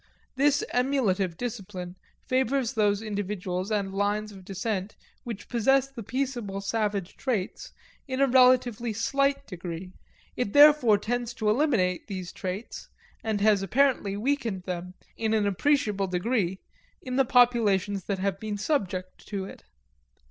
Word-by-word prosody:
This 285 +2 +3
emulative 215 -9 +1
discipline 195 -7 -5 0.3
favors 260 -1 +1
those 210 -2 +1
individuals 200 -3 -3
and 200 -3 -1
lines 205 +2 -1
of 195 -2 -12
descent 195 +1 -3 0.3
which 230 -4 -6
possess 270 +3 +2
the 255 -4 -8
peaceable 240 -4 -3
savage 200 -2 -2
traits 220 -8 -3 0.4
in 260 -1 -3
a 275 - +6
relatively 250 -3 +4
slight 275 +5 +1
degree. 180 -2 -7 0.4
It 225 -5 -2
therefore 290 -7 +7
tends 240 +3 -3
to 215 -2 +1
eliminate 215 - +1
these 185 -4 -5
traits, 190 +4 -6 0.3
and 215 -2 -1
it - - +1
has 210 -2 +4
apparently 210 -1 +1
weakened 230 -5 -1
them, 180 0 -5 0.2
in 220 -1 +1
an 210 -2 +2
appreciable 205 -1 +1
degree, 190 0 0 0.5
in 255 -1 -3
the 270 - +5
populations 220 -7 +3
that 200 - -1
have 195 0 -1
been 215 -1 -4
subject 190 - -2
to 195 -2 -3
it. - - -12
215 Hz, 140 wpm, -27 LUFS, 195-250 Hz, 0.5 s, therefore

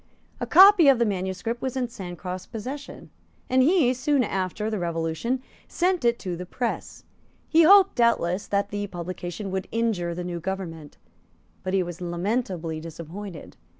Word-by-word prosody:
A - - -3
copy 380 -4 +8
of 275 -2 +7
the 235 - +2
manuscript 190 +4 -3
was 260 0 -3
in 250 -1 0
Sancroft's 180 -3 -7
possession; 260 +6 -7 0.4
and 260 0 +5
he, 285 -3 +4
soon 275 +1 +1
after 195 +1 -2
the 215 -2 -2
Revolution, 170 +9 -2 0.2
sent 360 0 0
it 235 0 +3
to 180 -3 -4
the 180 +1 -7
press. 240 +5 -4 0.4
He 330 - +5
hoped, 390 +3 +7
doubtless, 205 -6 +2
that 200 0 0
the 205 0 -3
publication 180 +2 -6
would 190 0 -3
injure 210 -7 -1
the 180 - -4
new 175 -1 -4
government; 165 -4 -6 0.6
but 185 +1 -2
he 190 - +2
was 175 0 -8
lamentably 175 -2 -2
disappointed. 165 +3 -9
195 Hz, 155 wpm, -25 LUFS, 175-245 Hz, 0.6 s, copy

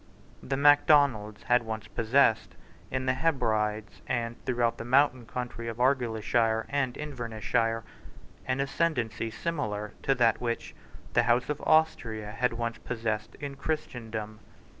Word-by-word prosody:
The 135 0 -2
Macdonalds 140 -7 +4
had 125 0 +3
once 110 -2 -5
possessed, 115 0 +2 0.3
in 130 0 -2
the 130 - +2
Hebrides 110 -7 0
and 120 -1 -2
throughout 120 -2 0
the - - -4
mountain 130 -1 +3
country 120 -2 -5
of 115 -1 -4
Argyleshire 115 -3 +1
and 135 -3 0
Invernessshire, 115 -4 -1 0.6
an 130 +1 0
ascendancy 135 -6 -1
similar 110 -7 -3
to 135 - +2
that 120 -2 +3
which 120 -1 -3 0.4
the 120 - +5
House 120 +3 +3
of 150 -1 -2
Austria 115 -9 +1
had 120 +2 0
once 115 0 -3
possessed 110 -3 -3
in 140 -1 -6
Christendom. 115 -8 -4
120 Hz, 130 wpm, -28 LUFS, 110-135 Hz, 0.6 s, the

